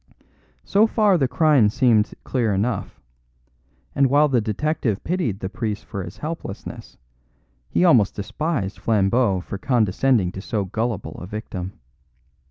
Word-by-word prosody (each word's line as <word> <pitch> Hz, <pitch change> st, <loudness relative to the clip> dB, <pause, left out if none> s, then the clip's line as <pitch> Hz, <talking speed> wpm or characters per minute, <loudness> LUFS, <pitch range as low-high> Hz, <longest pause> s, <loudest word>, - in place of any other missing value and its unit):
So 210 Hz, +3 st, +3 dB
far 210 Hz, -3 st, +3 dB
the 140 Hz, -6 st, +2 dB
crime 145 Hz, -7 st, +4 dB
seemed 115 Hz, -2 st, +2 dB
clear 115 Hz, -6 st, 0 dB
enough; 105 Hz, +2 st, -2 dB, 0.9 s
and 140 Hz, -1 st, +3 dB
while 145 Hz, +3 st, +4 dB
the 125 Hz, -4 st, +2 dB
detective 110 Hz, 0 st, -1 dB
pitied 150 Hz, -, -2 dB
the 95 Hz, -, -2 dB
priest 105 Hz, +1 st, -4 dB
for 100 Hz, -3 st, -5 dB
his 85 Hz, -, -9 dB
helplessness, 155 Hz, -10 st, -7 dB, 0.7 s
he 180 Hz, -, +2 dB
almost 120 Hz, -, +4 dB
despised 110 Hz, -, -3 dB
Flambeau 105 Hz, -2 st, +2 dB
for 100 Hz, +2 st, -7 dB
condescending 115 Hz, -3 st, +2 dB
to 95 Hz, -, -7 dB
so 105 Hz, -1 st, -2 dB
gullible 110 Hz, +1 st, -3 dB
a 90 Hz, -, -7 dB
victim. 95 Hz, -3 st, -6 dB
115 Hz, 135 wpm, -22 LUFS, 100-135 Hz, 0.9 s, crime